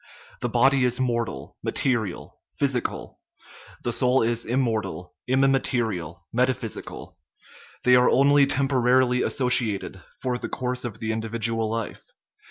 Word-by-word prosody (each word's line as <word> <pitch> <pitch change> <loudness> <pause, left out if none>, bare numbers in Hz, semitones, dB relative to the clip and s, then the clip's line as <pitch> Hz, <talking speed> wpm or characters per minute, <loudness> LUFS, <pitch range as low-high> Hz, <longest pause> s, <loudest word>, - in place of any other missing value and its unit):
The 120 - -2
body 130 +3 +3
is 125 0 +1
mortal, 115 - -2
material, 115 -9 -1 0.2
physical; 135 -4 -2 0.6
the 120 - -1
soul 125 +1 +2
is 115 0 -1
immortal, 110 -9 -2
immaterial, 120 - 0
metaphysical. 125 -2 -3 0.6
They 125 0 +6
are 125 0 +5
only 140 +1 +5
temporarily 130 -2 +2
associated, 115 -8 +1 0.2
for 125 -2 -2
the - - -5
course 125 0 -3
of 110 -3 -5
the 110 0 -1
individual 115 0 -2
life. 115 0 -4
120 Hz, 115 wpm, -25 LUFS, 110-130 Hz, 0.6 s, They